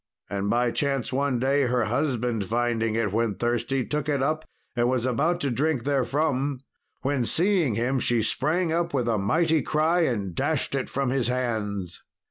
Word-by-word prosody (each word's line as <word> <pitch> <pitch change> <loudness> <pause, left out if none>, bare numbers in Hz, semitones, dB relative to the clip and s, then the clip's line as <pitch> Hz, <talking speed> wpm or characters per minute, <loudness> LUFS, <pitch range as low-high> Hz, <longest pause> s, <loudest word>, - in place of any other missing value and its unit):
And 100 0 -1
by 120 +1 +2
chance 135 -2 -1
one 140 -1 +1
day 135 +2 +2
her 125 -1 +1
husband 120 -3 -1
finding 115 0 0
it 115 -3 0
when 115 -2 +1
thirsty, 120 +3 -1
took 150 0 -2
it 140 -2 +1
up 155 +2 -1 0.3
and 120 0 +2
was 125 -2 0
about 155 +8 +1
to 140 - 0
drink 140 0 0
therefrom, 140 0 0 0.4
when, 135 -1 +1
seeing 170 - +2
him, 125 +4 0
she 120 -2 +2
sprang 160 - +1
up 170 -2 0
with 125 -3 0
a 110 -3 +1
mighty 160 +10 +2
cry 160 +3 +1
and 100 - -2
dashed 150 - -1
it 135 -1 -2
from 135 -2 -1
his 130 -3 +1
hands. 110 -7 -2
130 Hz, 175 wpm, -26 LUFS, 115-145 Hz, 0.4 s, by